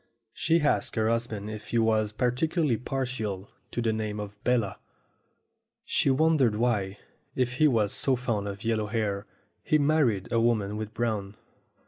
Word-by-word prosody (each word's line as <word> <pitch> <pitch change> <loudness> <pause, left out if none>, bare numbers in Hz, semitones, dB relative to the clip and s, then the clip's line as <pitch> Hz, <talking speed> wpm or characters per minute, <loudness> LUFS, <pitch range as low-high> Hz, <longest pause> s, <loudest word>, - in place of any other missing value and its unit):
She 165 +1 +2
asked 150 - +1
her 110 -1 +2
husband 115 -3 -2
if 110 -1 -8
he 120 - -1
was 110 -2 +2
particularly 130 +5 +1
partial 120 -7 -3 0.2
to 120 - -3
the 110 -1 +1
name 105 -1 -3
of 105 0 -8
Bella. 115 -6 +1 1.1
She - - +1
won 155 +4 +3
dered 120 -5 +3
why, 105 -4 0 0.4
if 125 -1 0
he 155 - +5
was 110 -7 +2
so 135 - +2
fond 115 -5 -2
of 100 0 -6
yellow 110 -2 0
hair, 105 -2 -2 0.3
he 155 - +2
married 140 -10 +2
a 115 - +3
woman 110 -3 +1
with 110 0 -4
brown. 105 -3 -2
115 Hz, 160 wpm, -28 LUFS, 105-125 Hz, 1.1 s, he